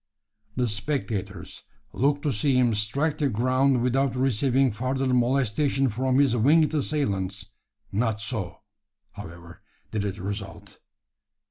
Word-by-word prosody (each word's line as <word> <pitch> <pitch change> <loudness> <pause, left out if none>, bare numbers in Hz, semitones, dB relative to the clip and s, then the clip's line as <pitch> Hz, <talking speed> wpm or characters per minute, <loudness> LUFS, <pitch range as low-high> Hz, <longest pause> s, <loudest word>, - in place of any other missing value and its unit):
The 125 -1 +1
spectators 110 -2 -4 0.3
looked 145 +2 +1
to 145 - 0
see 130 +6 +1
him 125 -2 +3
strike 140 +9 0
the 145 -2 +2
ground 130 +2 +2
without 130 0 +1
receiving 130 +1 +2
further 130 +5 -2
molestation 130 +2 +1
from 130 +4 0
his 135 -4 +3
winged 150 +7 +4
assailants. 100 -11 -2 0.4
Not 110 +1 0
so, 110 -6 -4 0.5
however, 85 +1 -11 0.3
did 105 -2 -1
it 100 -1 -3
result. 100 0 -7
125 Hz, 120 wpm, -25 LUFS, 105-135 Hz, 0.5 s, winged